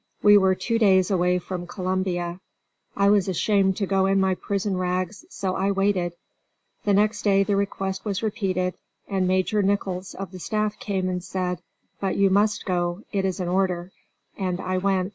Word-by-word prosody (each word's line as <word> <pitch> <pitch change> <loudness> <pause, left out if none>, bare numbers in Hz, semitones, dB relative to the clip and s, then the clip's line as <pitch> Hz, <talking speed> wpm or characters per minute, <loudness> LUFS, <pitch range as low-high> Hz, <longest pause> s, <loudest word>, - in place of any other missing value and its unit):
We 205 0 +8
were 190 -2 +5
two 230 +4 -1
days 190 -3 +4
away 180 -1 +2
from 180 -1 -5
Columbia. 180 -1 -2 0.6
I 200 0 +4
was 200 -3 +3
ashamed 190 +1 +2
to 200 - 0
go 195 0 +2
in 195 0 +3
my 190 -1 +2
prison 200 +1 -2
rags, 185 - -2
so 190 - -3
I 195 +1 +1
waited. 195 -3 +1 0.7
The 205 - +3
next 210 +1 +2
day 195 -1 +4
the 200 0 0
request 195 -1 -2
was 205 -1 -2
repeated, 190 -4 -1 0.3
and 190 -2 0
Major 185 +3 +2
Nichols 195 -2 -1
of 195 -2 -6
the 185 - -9
staff 215 +3 -2
came 190 -3 -2
and 180 -1 -2
said, 180 -3 -3 0.4
"But 195 -1 -1
you 195 -1 +4
must 205 +1 +2
go, 175 +1 -1
it 195 -2 0
is 190 -1 -2
an 180 - -2
order." 180 -1 0 0.5
And 185 -2 -1
I 185 0 -1
went. 190 -1 +1
190 Hz, 180 wpm, -24 LUFS, 185-200 Hz, 0.7 s, We